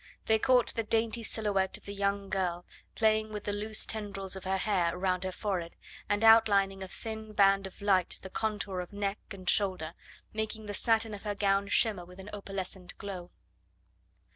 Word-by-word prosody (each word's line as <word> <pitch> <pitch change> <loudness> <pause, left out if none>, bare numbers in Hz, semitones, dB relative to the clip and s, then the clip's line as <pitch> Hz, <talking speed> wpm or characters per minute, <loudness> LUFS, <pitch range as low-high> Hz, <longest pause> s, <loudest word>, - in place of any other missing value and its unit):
They 220 0 +3
caught 250 +1 +3
the 230 - 0
dainty 225 +1 0
silhouette 205 -4 0
of - - -21
the 200 - -6
young 200 0 -1
girl, 175 -2 -1 0.3
playing 215 -1 +2
with 210 -1 -5
the 205 - -2
loose 215 +1 +1
tendrils 200 -3 -4
of 190 - -8
her 190 0 +1
hair 180 -4 +1
around 185 0 0
her 185 - -2
forehead, 185 -4 -3 0.3
and 205 +1 +1
outlining 205 -4 +6
with 190 -1 -6
a - - -13
thin 220 -1 -6
band 195 -1 +4
of 190 - -13
light 190 -3 +2
the 190 - -7
contour 205 -4 -1
of 180 - -6
neck 200 0 -2
and 185 -3 -9
shoulder, 185 -6 +3 0.4
making 220 0 -3
the 205 - -5
satin 225 +1 +2
of 200 - -7
her 205 -1 -3
gown 200 0 +2
shimmer 205 -3 +3
with 180 +1 -14
an 190 +2 -9
opalescent 190 -2 -6
glow. 185 -3 -6
200 Hz, 190 wpm, -30 LUFS, 190-215 Hz, 0.4 s, outlining